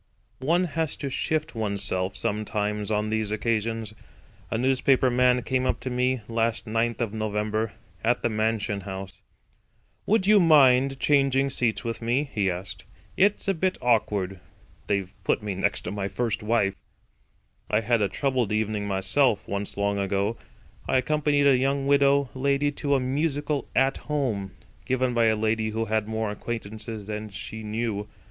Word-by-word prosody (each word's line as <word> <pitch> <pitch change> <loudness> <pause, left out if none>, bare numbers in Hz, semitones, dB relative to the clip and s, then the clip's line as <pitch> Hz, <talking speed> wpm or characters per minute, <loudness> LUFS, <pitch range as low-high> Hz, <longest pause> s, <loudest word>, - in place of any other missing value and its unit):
One 165 +7 +2
has 160 -2 -1
to 140 - -4
shift 155 +4 -1
oneself, 100 -4 -2
sometimes, 105 -1 -2
on 105 0 0
these 110 -1 0
occasions. 110 0 -1 0.6
A - - -1
newspaper 130 +1 +3
man 125 0 +3
came 130 -1 0
up - - 0
to 130 - -4
me 125 0 +1
last 115 0 0
Ninth 115 +1 -1
of 110 -3 -1
November 110 0 -1 0.3
at 120 +2 +1
the - - +3
Mansion 110 -2 0
House. 95 0 -7 0.9
"Would 210 -2 +3
you 210 +1 +6
mind 135 -5 +5
changing 135 -1 +3
seats 120 -4 0
with 115 0 -4
me?" 130 +5 0
he 100 -3 +1
asked. 90 +2 -6 0.3
"It's 200 +2 +2
a 195 - +3
bit 185 +2 0
awkward. 105 -6 +1 0.5
They've 100 -2 -1
put - - 0
me 105 -2 -2
next 95 - 0
to - - -5
my 100 -1 -2
first 115 +1 -2
wife." 105 -3 +1 1.0
I 105 - +2
had 115 0 +1
a 100 - +2
troubled 130 -6 0
evening 105 -1 -1
myself 100 +4 +2
once 100 0 -4
long 100 0 0
ago. 100 +3 0 0.5
I - - +3
accompanied 145 +1 +2
a 140 -2 +6
young 135 +1 0
widow 140 -1 +3
lady 140 +2 +1
to 145 0 0
a - - +3
musical 145 +2 -1
At 135 +1 +3
Home, 120 - -2 0.3
given 130 -1 0
by 120 -1 +3
a 110 -1 +4
lady 110 0 0
who 110 +1 -2
had 110 -1 0
more 110 -1 -2
acquaintances 110 0 -5
than 105 +1 -5
she 105 +3 -7
knew. 110 -1 -3
115 Hz, 160 wpm, -26 LUFS, 105-135 Hz, 1.0 s, you